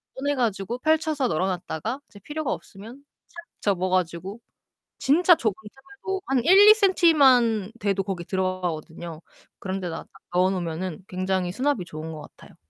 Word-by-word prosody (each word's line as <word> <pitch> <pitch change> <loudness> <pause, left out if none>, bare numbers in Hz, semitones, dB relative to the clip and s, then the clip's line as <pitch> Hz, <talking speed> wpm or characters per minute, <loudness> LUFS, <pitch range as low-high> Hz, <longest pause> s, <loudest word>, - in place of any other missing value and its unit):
꺼내 285 +2 -1
가지고 230 -2 -1
펼쳐서 310 -2 +1
널어 175 +4 0
놨다가 185 - -4
이제 205 - -15
필요가 300 +6 -4
없으면 230 +8 -11 0.2
착 340 -1 -11 0.2
접어 185 -2 0
가지고 185 +3 -2 0.6
진짜 345 +5 +5
좁은 220 -8 0
틈에도 275 - -7
한 260 -3 +1
1-2 400 +5 +9
센티만 270 - +4
돼도 195 -1 0
거기 185 -2 -4
들어가거든요. 175 -3 -4 0.4
그런 190 0 -4
데다가 170 -3 -5
딱 - - -22 0.2
넣어 185 +1 +4
놓으면은 180 0 -4
굉장히 185 -1 -1
수납이 255 -3 -1
좋은 160 -1 -7
것 155 - -8
같아요. - - -15
200 Hz, 340 characters per minute, -25 LUFS, 180-275 Hz, 0.6 s, 1-2